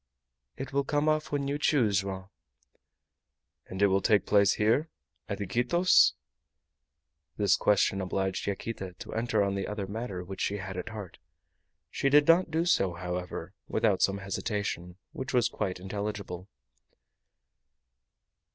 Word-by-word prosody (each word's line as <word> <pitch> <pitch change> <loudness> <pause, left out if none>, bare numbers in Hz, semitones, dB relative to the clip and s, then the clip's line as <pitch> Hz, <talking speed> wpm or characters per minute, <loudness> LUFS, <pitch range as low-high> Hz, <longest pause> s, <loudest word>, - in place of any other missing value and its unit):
"It 135 0 -6
will 140 0 +2
come 145 +2 0
off 155 0 +1
when 140 -1 -1
you 145 +1 -2
choose, 115 -10 +3
Joam." 95 0 -6 1.4
"And 95 +2 -2
it - - +8
will 95 0 +3
take 105 0 +3
place 100 -1 +4
here 115 +9 +2 0.4
at 100 - -3
Iquitos?" 120 - +4 1.2
This 100 -2 +4
question 100 -1 +2
obliged 95 +1 -2
Yaquita 100 -2 -4
to 90 - -9
enter 110 -2 +1
on 100 0 0
the 100 -1 -2
other 105 -1 -3
matter 100 -2 -5
which 95 +1 -7
she 100 - 0
had 95 -1 -6
at 90 +4 -5
heart. 105 -5 -8 0.7
She 140 - +1
did 145 +1 +5
not 170 +2 +5
do 160 +2 0
so, 95 - +2
however, 90 0 -5
without 110 -4 +1
some 100 0 +3
hesitation, 95 -3 -3
which 130 0 -4
was 120 -1 +4
quite 95 -5 -3
intelligible. 100 -1 -5
100 Hz, 140 wpm, -29 LUFS, 95-120 Hz, 1.4 s, it